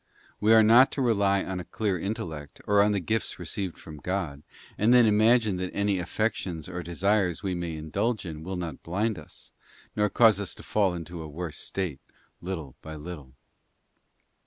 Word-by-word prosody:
We 105 +1 +3
are 110 - +7
not 120 +5 +7
to 140 - -2
rely 100 -4 +2
on 95 -1 -4
a - - -5
clear 105 +1 -1
intellect, 80 -8 -5
or 100 0 +4
on 105 +1 +4
the 100 - +1
gifts 110 +4 -2
received 95 -4 -4
from 80 -2 -10
God, 85 -3 -3 0.3
and 110 +3 +3
then 125 -1 +7
imagine 110 -1 +4
that 90 0 -3
any 100 -1 +1
affections 90 -3 -2
or 90 -1 -5
desires 90 +1 0
we 95 -2 -1
may 85 -2 -3
indulge 100 +9 -2
in 80 -3 -6
will 95 +4 -5
not 85 -5 -5
blind 100 +3 -1
us, 75 - -12 0.4
nor 105 -1 +2
cause 110 -1 +5
us 100 -5 -3
to - - -12
fall 100 -4 +1
into 85 0 -7
a 80 - -7
worse 80 +1 -6
state, 90 -9 -3 0.4
little 85 -7 -5
by 80 0 -8
little. 75 -4 -9
95 Hz, 180 wpm, -27 LUFS, 85-105 Hz, 0.4 s, are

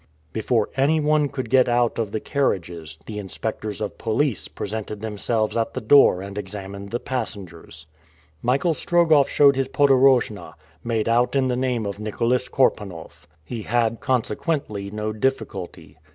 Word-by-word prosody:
Before 110 0 0
anyone 150 +1 +2
could 130 -5 -5
get 130 -2 +5
out 120 -1 +1
of 110 -3 -2
the 110 - -2
carriages, 85 - -2
the 105 +2 -6
inspectors 105 +1 -5
of 105 - -4
police 110 - 0
presented 105 +4 -5
themselves 110 0 -1
at 115 -1 -1
the - - -1
doors 110 -6 +5
and 100 +1 -6
examined 100 0 -7
the 120 - -2
passengers. 90 - -6 0.6
Michael 140 +7 +2
Strogoff 160 -4 +3
showed 140 -2 +5
his 135 0 0
podorojna, 135 -6 +3 0.3
made 115 -2 -1
out 120 +3 +2
in 130 -1 +2
the 125 - +1
name 125 -3 -1
of 100 0 -5
Nicholas 115 +4 -1
Korpanoff. 100 -10 -1 0.2
He 115 +4 -5
had 115 +1 0
consequently 125 -4 -1
no 105 +1 -3
difficulty. 110 -6 -3
115 Hz, 145 wpm, -23 LUFS, 105-130 Hz, 0.6 s, get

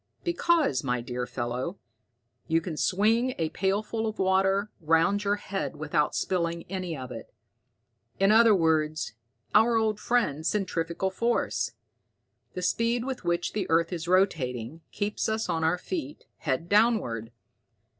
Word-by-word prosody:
"Because, 340 - +2
my 125 -2 0
dear 125 +1 -4
fellow, 125 +9 -3 0.7
you 165 0 +3
can 165 -1 -5
swing 225 +10 +2
a 160 -2 0
pailful 210 +5 -1
of 215 - -4
water 195 +2 +2
round 165 +5 +2
your 205 0 +2
head 195 -4 -4
without 150 0 0
spilling 170 -2 -1
any 180 -4 -3
of 130 -1 -7
it. 115 -2 -8 0.9
In 195 +1 +4
other 225 -1 +7
words, 155 - +1 0.4
our 225 +2 +5
old 215 -2 +1
friend, 160 - 0
centrifugal 180 -1 -1
force. 235 +5 0 0.8
The 180 - -4
speed 230 +5 +1
with 265 -2 -4
which 175 0 -1
the 200 -3 -2
earth 165 +2 +2
is 170 -1 -4
rotating, 160 - 0
keeps 205 +1 -2
us 220 0 -1
on 165 0 -1
our 165 +3 +2
feet, 300 - -5
head 150 +3 -2
downward. 200 - +2
185 Hz, 140 wpm, -27 LUFS, 160-215 Hz, 0.9 s, other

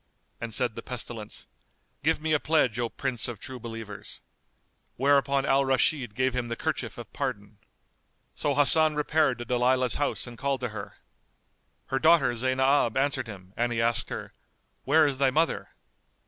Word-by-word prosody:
And 115 -1 -5
said 120 +1 +1
the 115 - -7
Pestilence, 115 -3 -6 0.6
"Give 160 +3 +2
me 155 0 0
a 150 - +3
pledge, 135 -8 +1
O 120 -1 0
Prince 130 -2 -2
of 120 -5 -6
True 130 +2 -7
Believers!" 115 -3 -8 0.7
Whereupon 140 0 +3
Al 135 +1 +3
Rashid 130 -3 +1
gave 130 0 +1
him 125 -1 -2
the 115 - -3
kerchief - - -3
of - - -10
pardon. 100 +1 -4 0.7
So 145 -1 -1
Hasan 155 +2 +5
repaired 150 -3 +2
to 120 - -6
Dalilah's 125 0 +1
house 145 - -1
and 120 -2 -10
called 135 -1 -1
to 125 - -2
her. 105 -2 -8 0.9
Her 135 0 -1
daughter 155 -5 +5
Zaynab 130 0 +2
answered 135 -2 0
him 95 -3 -11
and 120 +1 0
he 115 - -1
asked 115 0 0
her, - - -6 0.5
"Where 155 +3 +5
is 140 -2 -1
thy 135 -1 +4
mother?" 160 +5 0
130 Hz, 165 wpm, -27 LUFS, 115-140 Hz, 0.9 s, Hasan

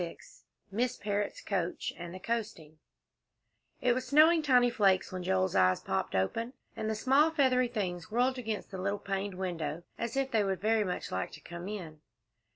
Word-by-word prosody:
XXVI 170 - -10 0.3
MISS 240 +5 0
PARROTT'S 205 0 -2
COACH 180 -4 -2
AND 175 0 -7
THE 185 - -8
COASTING 185 -9 -4 1.0
It 250 -1 +4
was 255 +1 -3
snowing 315 +5 +6
tiny 250 -5 +4
flakes 195 -5 +3
when 185 -1 -4
Joel's 185 0 +1
eyes 95 0 +4
popped 95 - -2
open, 230 - -1 0.2
and 220 - -2
the 220 - 0
small, 270 +8 +4
feathery 260 -5 +3
things 185 -6 -3
whirled 250 +3 +1
against 220 -4 -4
the 190 - -5
little 200 +2 0
paned 195 -1 -3
window, 170 -4 -3 0.2
as 235 +3 -3
if 270 -1 0
they 220 -2 +3
would 190 -2 -1
very 220 +2 +2
much 180 -3 -4
like 95 - -2
to - - -9
come 175 +1 -8
in. 170 -7 -7
205 Hz, 180 wpm, -31 LUFS, 180-245 Hz, 1.0 s, snowing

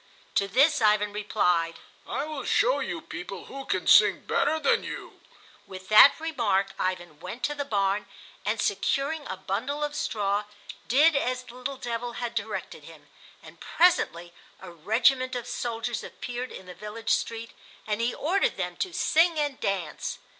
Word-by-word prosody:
To 200 - +2
this 275 +7 +3
Ivan 210 -1 +3
replied, 180 -5 +1 0.3
"I 280 - -2
will 310 -2 -5
show - - +2
you - - -4
people - - -8
who 275 0 -8
can 185 -2 -1
sing 210 -2 +6
better 310 +3 +1
than 285 - +2
you." - - -8 0.5
With 185 0 -10
that 215 +8 +8
remark 225 -12 0
Ivan 175 -4 -3
went 235 +9 -8
to 295 - +1
the 285 -1 -4
barn 200 -3 0 0.4
and, - - -1
securing 290 +2 0
a 190 - -5
bundle 255 +11 -3
of 295 0 -3
straw, 205 -1 -1 0.4
did 295 +6 +5
as 255 -2 0
the 245 - -13
little 255 +2 -5
devil 240 -1 -4
had 235 0 -4
directed 220 -2 -5
him; - - -15 0.3
and - - -14
presently 175 - +2 0.3
a 185 -2 -10
regiment 245 - +2
of 245 - -4
soldiers 235 -1 -3
appeared 245 +1 -6
in 190 - -10
the 180 - -9
village 210 +5 -5
street, 230 0 -1 0.3
and 210 +1 -1
he 235 +1 +1
ordered 365 +7 +1
them - - -3
to 380 -5 -3
sing 330 0 +3
and 290 -3 -1
dance. 190 -6 -3
230 Hz, 165 wpm, -27 LUFS, 200-275 Hz, 0.5 s, that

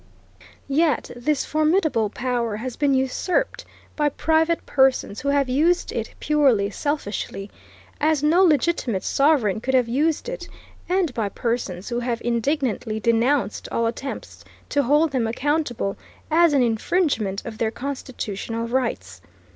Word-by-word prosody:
Yet 295 0 +1
this 270 +4 0
formidable 310 - +1
power 240 -2 -2
has 240 +3 -5
been 285 -2 +2
usurped 265 - -1 0.3
by 295 -1 +2
private 320 +3 +1
persons 265 -5 +2
who 280 - -4
have 280 -1 +2
used 315 +8 +2
it - - -4
purely 265 -10 +2
selfishly, 205 -6 -3 0.5
as 305 -1 +2
no 325 +5 +4
legitimate 295 - +2
sovereign 275 -8 +2
could 265 +2 0
have 250 -2 +3
used 295 - 0
it, - - -6 0.4
and 360 -6 +1
by 220 -4 -1
persons 205 -6 -3
who 240 0 -1
have 240 -1 -2
indignantly 240 -2 -1
denounced 235 +1 +1
all 230 - 0
attempts 250 +4 -5 0.3
to 285 - +2
hold 295 +4 +3
them 250 -4 0
accountable, 250 -4 -1 0.3
as 335 0 +5
an 270 -3 +4
infringement 225 - 0
of 220 -2 -7
their 225 - +1
constitutional 230 -4 -5
rights. 100 - -2
260 Hz, 135 wpm, -23 LUFS, 230-300 Hz, 0.5 s, as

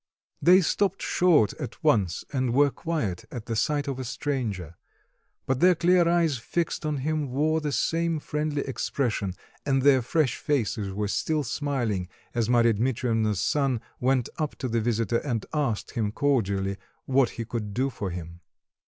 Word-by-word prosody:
They 180 +2 +7
stopped 195 +2 0
short 160 - +3
at - - -7
once 95 -6 +2
and 130 -3 0
were 145 0 +5
quiet 145 - -3
at 115 -3 -7
the 115 - -3
sight 145 +5 0
of 135 -2 -3
a - - -3
stranger; 115 - -3 0.7
but 130 -1 0
their 180 +2 +6
clear 175 +1 +4
eyes 165 -6 +2
fixed 155 +6 -2
on 150 -1 -1
him 155 -3 -1
wore 155 +5 +1
the 150 -1 -2
same 165 +2 0
friendly 150 -1 -2
expression, 115 -7 -2 0.3
and 135 -2 +1
their 135 -2 +6
fresh 130 +2 +1
faces 110 -8 -1
were 105 +2 -2
still 155 +8 0
smiling 120 -11 -2 0.3
as 115 -2 0
Marya 120 -1 +4
Dmitreivna's 115 -3 0
son 135 -5 +1 0.2
went 130 -1 +2
up 155 -2 -2
to 130 - -4
the 115 -1 0
visitor 115 0 +1
and 120 -7 -3
asked 140 -9 -1
him 105 -3 -1
cordially 100 -8 0 0.3
what 135 -1 +3
he 115 - -3
could 110 -2 -4
do 135 +3 +1
for 100 -5 -4
him. 85 -1 -7
130 Hz, 165 wpm, -26 LUFS, 110-150 Hz, 0.7 s, They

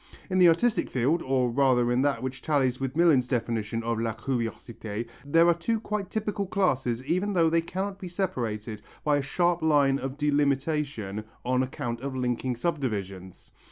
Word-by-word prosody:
In 185 - +2
the 180 - +8
artistic 215 +8 +2
field, 135 +7 +1
or 130 -2 +1
rather 125 -2 +3
in 125 +1 +2
that 140 -2 0
which 130 0 -4
tallies 135 -5 +1
with 135 +2 -3
Millin's 155 -8 +4
definition 115 -2 -2
of 115 -1 -1
la 115 -1 -1
curiosité 115 -2 -4 0.2
there 165 +4 +4
are 170 - +6
two 220 +7 -1
quite 210 -3 -3
typical 210 -2 -2
classes 130 - 0
even 185 +7 0
though 165 -3 +3
they 165 0 +3
cannot 190 +3 -4
be 190 - -6
separated 115 - -3 0.2
by 150 -1 +3
a - - 0
sharp 175 +4 +1
line 145 -3 +3
of 135 +1 -5
delimitation 140 -7 0 0.2
on 125 +1 +2
account 120 -2 -4
of 135 -1 -4
linking 125 0 -1
subdivisions. 105 - -4
135 Hz, 170 wpm, -27 LUFS, 120-165 Hz, 0.2 s, the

